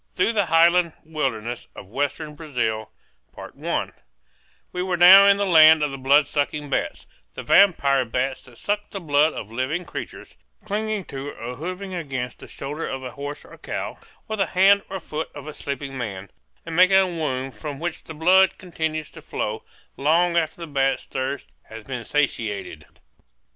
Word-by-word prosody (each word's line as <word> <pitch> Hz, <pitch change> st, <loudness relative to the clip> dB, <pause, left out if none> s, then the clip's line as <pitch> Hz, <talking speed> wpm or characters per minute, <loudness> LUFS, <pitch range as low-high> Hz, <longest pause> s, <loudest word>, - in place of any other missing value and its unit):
THROUGH 230 Hz, -, +2 dB
THE 205 Hz, -3 st, +2 dB
HIGHLAND 170 Hz, 0 st, +4 dB
WILDERNESS 120 Hz, -7 st, -3 dB
OF 95 Hz, -, -11 dB
WESTERN 145 Hz, +3 st, -2 dB
BRAZIL 125 Hz, -8 st, -3 dB, 1.8 s
We 180 Hz, -, -3 dB
were 180 Hz, -1 st, -1 dB
now 190 Hz, +3 st, +9 dB
in 200 Hz, 0 st, +6 dB
the 200 Hz, -, 0 dB
land 160 Hz, -3 st, +7 dB
of 145 Hz, -, 0 dB
the 135 Hz, -, -7 dB
bloodsucking 145 Hz, +1 st, +1 dB
bats, -, -, -2 dB, 0.3 s
the -, -, -6 dB
vampire 140 Hz, -9 st, +4 dB
bats 125 Hz, +3 st, -2 dB
that 125 Hz, -2 st, -17 dB
suck 210 Hz, 0 st, -2 dB
the 195 Hz, -, -6 dB
blood 150 Hz, -2 st, +2 dB
of 105 Hz, -, -7 dB
living 130 Hz, +9 st, -2 dB
creatures, -, -, -8 dB, 0.3 s
clinging 215 Hz, -1 st, -2 dB
to 135 Hz, +1 st, -6 dB
or 120 Hz, +2 st, -7 dB
hovering 185 Hz, +6 st, -6 dB
against 135 Hz, -8 st, -4 dB
the -, -, -11 dB
shoulder 145 Hz, +4 st, -5 dB
of 135 Hz, 0 st, -5 dB
a 125 Hz, -, -6 dB
horse 145 Hz, 0 st, -7 dB
or -, -, -15 dB
cow, -, -, -5 dB, 0.3 s
or 220 Hz, -, -3 dB
the 195 Hz, -, +1 dB
hand 195 Hz, +2 st, +5 dB
or 190 Hz, -, -4 dB
foot 155 Hz, -1 st, -5 dB
of 145 Hz, 0 st, -9 dB
a 155 Hz, -, -6 dB
sleeping 140 Hz, -1 st, -5 dB
man, 100 Hz, -6 st, -6 dB, 0.3 s
and 165 Hz, -1 st, -5 dB
making 185 Hz, +2 st, +6 dB
a 190 Hz, -, +5 dB
wound 135 Hz, -7 st, -3 dB
from 140 Hz, +6 st, -7 dB
which 170 Hz, 0 st, -4 dB
the 160 Hz, -, -9 dB
blood 185 Hz, +4 st, +4 dB
continues 160 Hz, -4 st, -4 dB
to -, -, -12 dB
flow -, -, -4 dB, 0.4 s
long 170 Hz, +5 st, +2 dB
after 170 Hz, 0 st, 0 dB
the -, -, -4 dB
bat's 135 Hz, -3 st, 0 dB
thirst 135 Hz, +1 st, -4 dB, 0.2 s
has 110 Hz, 0 st, -10 dB
been 125 Hz, 0 st, -5 dB
satiated. 115 Hz, -7 st, -2 dB
150 Hz, 170 wpm, -23 LUFS, 135-175 Hz, 1.8 s, now